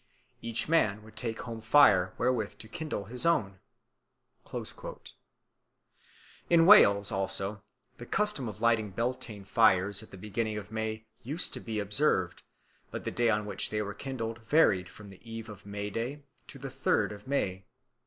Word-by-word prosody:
Each 115 Hz, 0 st, -1 dB
man 110 Hz, -10 st, +2 dB
would 110 Hz, 0 st, -16 dB
take 115 Hz, -2 st, -4 dB
home 115 Hz, -2 st, -7 dB
fire 110 Hz, -7 st, +5 dB
wherewith 120 Hz, -4 st, -1 dB
to 110 Hz, -, -8 dB
kindle 115 Hz, -4 st, -5 dB
his 125 Hz, +7 st, 0 dB
own." 100 Hz, -, +1 dB, 2.9 s
In 165 Hz, -1 st, +5 dB
Wales 100 Hz, -, +7 dB
also 95 Hz, +1 st, 0 dB, 0.4 s
the 120 Hz, -, -9 dB
custom 210 Hz, -, 0 dB
of 105 Hz, 0 st, -10 dB
lighting 115 Hz, -2 st, +2 dB
Beltane 110 Hz, -1 st, -4 dB
fires 100 Hz, -1 st, +3 dB
at 110 Hz, -, -13 dB
the 95 Hz, -, -11 dB
beginning 105 Hz, +2 st, -3 dB
of 105 Hz, 0 st, -8 dB
May 110 Hz, 0 st, -4 dB, 0.2 s
used 150 Hz, +8 st, -2 dB
to -, -, -3 dB
be 110 Hz, -2 st, -5 dB
observed, 100 Hz, -, +1 dB, 0.5 s
but -, -, -6 dB
the -, -, -3 dB
day 120 Hz, -1 st, +1 dB
on 105 Hz, -1 st, +1 dB
which 100 Hz, -2 st, -2 dB
they 105 Hz, 0 st, -1 dB
were 100 Hz, 0 st, -5 dB
kindled 115 Hz, -3 st, -5 dB
varied 110 Hz, -, +3 dB
from 105 Hz, -2 st, -13 dB
the 95 Hz, -, -15 dB
eve 115 Hz, 0 st, -6 dB
of 105 Hz, -1 st, -12 dB
May 100 Hz, 0 st, -5 dB
Day 130 Hz, +7 st, -4 dB, 0.2 s
to -, -, -11 dB
the 135 Hz, 0 st, -7 dB
third 105 Hz, -5 st, +1 dB
of 105 Hz, +2 st, -11 dB
May. 95 Hz, -9 st, -1 dB
110 Hz, 165 wpm, -30 LUFS, 100-120 Hz, 2.9 s, Wales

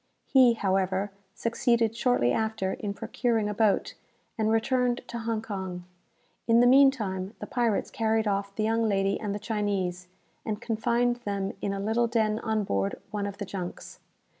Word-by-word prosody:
He, 255 Hz, -3 st, +6 dB
however, 195 Hz, -1 st, 0 dB, 0.2 s
succeeded 230 Hz, -1 st, +1 dB
shortly 235 Hz, -, +2 dB
after 220 Hz, -4 st, -1 dB
in 200 Hz, -1 st, -4 dB
procuring 225 Hz, -1 st, -1 dB
a 210 Hz, -, -2 dB
boat, 210 Hz, -1 st, +1 dB, 0.4 s
and 220 Hz, -1 st, 0 dB
returned 245 Hz, +2 st, +1 dB
to 235 Hz, -, -4 dB
Hong 225 Hz, -1 st, -2 dB
Kong. 190 Hz, -4 st, -5 dB, 0.6 s
In 230 Hz, 0 st, +5 dB
the 245 Hz, -, +6 dB
meantime 235 Hz, -7 st, +3 dB
the -, -, -6 dB
pirates 235 Hz, -5 st, 0 dB
carried 220 Hz, 0 st, +1 dB
off 200 Hz, 0 st, -1 dB
the 215 Hz, -, -1 dB
young 225 Hz, 0 st, +1 dB
lady 195 Hz, -1 st, +1 dB
and 205 Hz, -2 st, -3 dB
the -, -, -2 dB
Chinese, 200 Hz, -4 st, -2 dB, 0.4 s
and 215 Hz, -2 st, -3 dB
confined 240 Hz, +1 st, 0 dB
them 200 Hz, -4 st, -3 dB
in 200 Hz, -, -1 dB
a 195 Hz, -, -3 dB
little 220 Hz, +4 st, +1 dB
den 220 Hz, -2 st, +1 dB
on 220 Hz, -2 st, -1 dB
board 100 Hz, -, -1 dB, 0.2 s
one 205 Hz, -1 st, -2 dB
of 200 Hz, 0 st, -7 dB
the 205 Hz, -, -4 dB
junks. 185 Hz, -2 st, -7 dB
215 Hz, 165 wpm, -27 LUFS, 200-230 Hz, 0.6 s, He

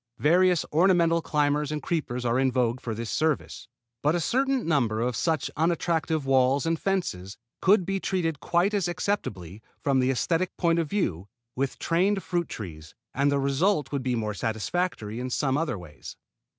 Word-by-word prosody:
Various 180 Hz, +2 st, +3 dB
ornamental 170 Hz, 0 st, +4 dB
climbers 150 Hz, -1 st, 0 dB
and 150 Hz, -, -2 dB
creepers 135 Hz, -6 st, -3 dB
are 120 Hz, +2 st, +2 dB
in 135 Hz, -1 st, +2 dB
vogue 125 Hz, -1 st, 0 dB
for 115 Hz, -2 st, -4 dB
this 115 Hz, 0 st, -5 dB
service; 150 Hz, -8 st, -1 dB, 0.3 s
but 150 Hz, +3 st, +2 dB
a -, -, +1 dB
certain 265 Hz, +7 st, +1 dB
number 120 Hz, -9 st, +1 dB
of 120 Hz, +1 st, -1 dB
such 155 Hz, +5 st, 0 dB
unattractive 160 Hz, -2 st, 0 dB
walls 135 Hz, +1 st, +3 dB
and 165 Hz, -1 st, 0 dB
fences 105 Hz, -, -2 dB, 0.2 s
could 190 Hz, -1 st, +4 dB
be 195 Hz, +1 st, -1 dB
treated 165 Hz, -6 st, -1 dB
quite 175 Hz, +4 st, +1 dB
as 195 Hz, -4 st, +1 dB
acceptably, 110 Hz, -, -3 dB, 0.2 s
from 135 Hz, -2 st, +2 dB
the 130 Hz, 0 st, +2 dB
esthetic 165 Hz, +7 st, 0 dB
point 170 Hz, -1 st, +2 dB
of 160 Hz, -3 st, -1 dB
view, 100 Hz, -, -1 dB, 0.3 s
with 135 Hz, +1 st, -2 dB
trained 190 Hz, +4 st, +1 dB
fruit 175 Hz, -2 st, -2 dB
trees, 80 Hz, -7 st, -8 dB, 0.2 s
and 140 Hz, +1 st, +2 dB
the 140 Hz, -, +2 dB
result 140 Hz, +2 st, +1 dB
would 140 Hz, -2 st, -1 dB
be 125 Hz, -1 st, -1 dB
more 110 Hz, -2 st, -2 dB
satisfactory 110 Hz, -, -2 dB
in 130 Hz, +1 st, -3 dB
some 135 Hz, +1 st, 0 dB
other 150 Hz, -7 st, -1 dB
ways. 80 Hz, -5 st, -11 dB
150 Hz, 175 wpm, -26 LUFS, 125-175 Hz, 0.3 s, ornamental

